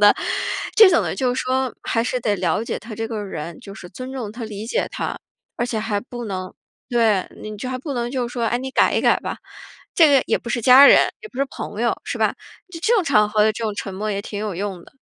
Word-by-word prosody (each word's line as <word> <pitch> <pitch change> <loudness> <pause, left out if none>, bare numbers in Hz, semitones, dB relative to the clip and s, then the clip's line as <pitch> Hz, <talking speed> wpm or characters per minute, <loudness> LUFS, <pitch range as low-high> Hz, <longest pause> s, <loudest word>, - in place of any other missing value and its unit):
的 205 0 +7 0.6
这 435 -3 +9
种 340 - +3
的 - - -2
就 250 -2 0
说 260 0 -1
还 230 0 0
是 250 0 -1
得 210 -3 0
了 180 +3 0
解 - - -3
他 220 -1 -9
这 225 +1 -4
个 215 -3 -4
人， 170 -3 -6
就 195 -4 -10
是 175 - -10
尊 255 +8 -8
重 240 -6 -5
他、 230 0 -6
理 210 -1 -6
解 - - 0
他。 - - -3 0.4
而 240 - -1
且 230 -3 -2
还 210 -2 -1
不 240 +1 -8
能 185 -2 -5 0.4
对， 225 -6 +2
你 215 0 -6
就 250 +5 -5
还 255 - -2
不 280 0 -5
能 240 0 -2
就 255 -2 -1
是 - - -11
说： 235 -2 -2
“哎， 240 - 0
你 265 +1 -5
改 - - +3
一 - - +2
改 - - +3
吧。” - - -5 0.6
这 325 - +7
个 270 - +5
也 - - +1
不 235 - -9
是 235 -2 -1
家 260 +4 +9
人， - - +8 0.2
也 435 - -10
不 250 - -11
是 275 - +3
朋 210 +2 -6
友， 240 - +1
是 - - -4
吧？ - - +2 0.4
就 335 - -7
这 465 +7 +3
种 415 - +3
场 210 -8 +3
合 210 0 +2
的 220 - +3
这 225 +1 -5
种 215 -2 -2
沉 195 - -5
默 210 +2 -3
也 200 0 -2
挺 205 - -6
有 210 -3 -3
用 190 -2 -4
的。 - - -19
230 Hz, 285 characters per minute, -21 LUFS, 205-255 Hz, 0.6 s, 这